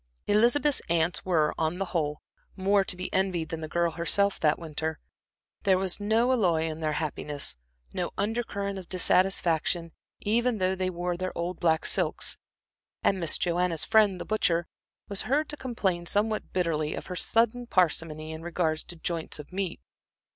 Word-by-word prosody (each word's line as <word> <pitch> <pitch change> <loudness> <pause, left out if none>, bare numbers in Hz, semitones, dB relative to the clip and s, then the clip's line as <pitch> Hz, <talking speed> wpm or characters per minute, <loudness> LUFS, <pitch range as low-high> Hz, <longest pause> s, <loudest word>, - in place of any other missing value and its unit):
Elizabeth's 245 +7 +3
aunts 170 +1 +1
were 160 -5 +2
on 160 +2 0
the 195 - -1
whole, 150 -3 -1 0.3
more 195 +1 +3
to 185 - -1
be 185 - -5
envied 185 -4 0
than 165 -1 -4
the 155 - -4
girl 170 +1 +1
herself 185 +5 +2
that 150 -1 +3
winter. 160 -1 -4 0.6
There 190 -2 +3
was 185 0 0
no 220 +4 +2
alloy 180 -10 +2
in 160 -1 -3
their 155 -1 -1
happiness, 150 - -2 0.4
no - - -2
under 220 +4 0
current 200 -3 -4
of 180 - -12
dissatisfaction, 175 -2 +2 0.3
even 235 +2 +1
though 185 -1 +1
they 185 -1 -1
wore 175 0 -3
their 185 +1 -4
old 170 +1 -3
black 160 -2 +2
silks, - - +2 0.6
and 195 - +2
Miss 165 -3 +3
Joanna's 175 -2 +1
friend, 210 -4 +4
the - - -5
butcher, 175 -6 +1 0.4
was 200 +2 -1
heard 295 +4 +2
to 295 - -5
complain 195 -11 -2
somewhat 215 +3 0
bitterly 160 -4 0
of - - -6
her 180 - -6
sudden 235 +5 +1
parsimony 160 -5 0
in 160 0 -7
regard 165 -2 -1
to 175 - -6
joints 165 0 -3
of 150 +4 -11
meat. 190 -2 -2
180 Hz, 170 wpm, -28 LUFS, 165-200 Hz, 0.6 s, friend